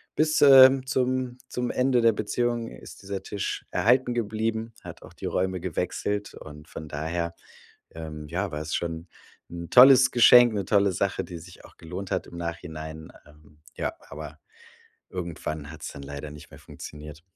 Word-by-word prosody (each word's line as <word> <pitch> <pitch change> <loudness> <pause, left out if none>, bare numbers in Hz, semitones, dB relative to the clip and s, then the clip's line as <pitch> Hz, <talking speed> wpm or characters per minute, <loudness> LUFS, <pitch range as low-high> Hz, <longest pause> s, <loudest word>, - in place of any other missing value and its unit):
bis, 155 0 +2
ähm, 135 -1 +8
zum 130 0 -1
zum 125 0 -3
Ende 125 -1 +2
der 115 0 +5
Beziehung 120 +2 -1
ist - - -13
dieser 100 0 -5
Tisch 100 -2 -4
erhalten 125 +2 +2
geblieben, 110 0 -2
hat - - -10
auch - - -14
die - - -9
Räume 95 -1 -1
gewechselt. 95 +3 -3
Und 75 0 -12
von 80 -2 -9
daher, 85 +3 -3 0.6
ähm, 75 -2 -8
ja, 95 +5 -2
war 75 - -4
es 80 0 -4
schon 85 0 -5 0.4
'n 85 -1 -8
tolles 130 0 +8
Geschenk, 120 0 +7
'ne 100 -2 -2
tolle 100 -2 +3
Sache, 95 +1 -1
die 85 0 -8
sich 85 +2 -14
auch - - -17
gelohnt 90 +4 -7
hat 95 - -2
im 85 - -11
Nachhinein. 80 -2 -7 0.2
Ähm, 75 0 -21
ja, - - -3 0.2
aber 75 +1 -9 0.7
irgendwann 80 -4 -5
hat's 80 -1 -8
dann 70 - -9
leider 70 +1 -7
nicht 75 0 -12
mehr - - -13
funktioniert. 75 0 -11
90 Hz, 165 wpm, -26 LUFS, 80-115 Hz, 0.7 s, ähm